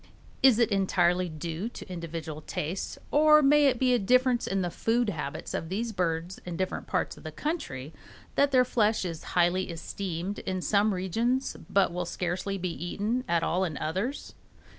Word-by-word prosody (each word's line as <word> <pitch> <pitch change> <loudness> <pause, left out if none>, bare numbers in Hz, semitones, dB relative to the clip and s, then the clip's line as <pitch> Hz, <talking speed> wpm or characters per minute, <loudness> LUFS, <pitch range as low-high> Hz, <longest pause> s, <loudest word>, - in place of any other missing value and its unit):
Is 260 -4 +6
it 235 -1 +3
entirely 185 -2 +2
due 165 +6 -4
to - - -10
individual 165 -3 -6
taste, 160 +4 -4
or 305 0 +6
may 290 +1 +6
it 255 -2 +2
be 255 0 +3
a 245 - +3
difference 250 +3 +3
in 195 -1 0
the 175 - -2
food 230 +4 +1
habits 150 -5 -5
of 160 - -3
these 225 +5 -2
birds 175 -2 -2
in 175 -2 -5
different 185 0 -3
parts - - -1
of - - -14
the - - -6
country 155 - -4 0.4
that 280 0 +3
their 255 -2 +4
flesh 220 -4 +1
is 165 -3 -5
highly 180 +2 +3
esteemed 175 +2 -4
in 185 -1 -3
some 205 +3 +2
regions 230 +9 0
but 195 -3 +3
will 180 0 -2
scarcely 180 +3 -2
be 180 -2 -3
eaten 215 +8 -1
at 170 -1 +1
all 180 +3 +1
in 160 -6 -2
others? 190 - -3
190 Hz, 180 wpm, -28 LUFS, 170-235 Hz, 0.4 s, Is